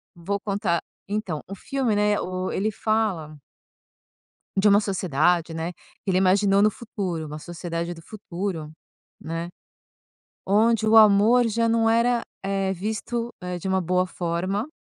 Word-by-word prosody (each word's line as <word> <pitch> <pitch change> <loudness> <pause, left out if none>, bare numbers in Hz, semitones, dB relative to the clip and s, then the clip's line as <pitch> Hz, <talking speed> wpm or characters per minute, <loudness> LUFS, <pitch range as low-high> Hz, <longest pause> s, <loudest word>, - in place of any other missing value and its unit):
Vou 190 +4 -3
contar, 200 -4 -1 0.3
então, 200 -7 -3
o 195 - -6
filme, 250 +1 -1
né, 210 0 +2
o 185 0 -3
ele 210 +3 0
fala 205 -8 -1 1.2
de 195 +2 +4
uma 205 0 +6
sociedade, 175 -4 +1
né 165 +2 -3
que 190 - -9
ele 185 - +3
imaginou 195 +1 +4
no 215 - +5
futuro, 195 -8 -4
uma 150 0 -7
sociedade 170 +1 -5
do 165 - -13
futuro, 180 -4 -5 0.5
né. 165 +1 -4 1.0
Onde 220 +2 +3
o 220 +1 +5
amor, 220 +3 +6
já 230 +1 +1
não 225 0 +3
era, 235 +1 +3 0.2
eh, 195 0 0
visto, 220 +5 -3
eh, 180 -1 -4
de 185 - -5
uma 190 0 +2
boa 180 +1 +1
forma, 185 +5 -2
195 Hz, 145 wpm, -24 LUFS, 175-215 Hz, 1.2 s, uma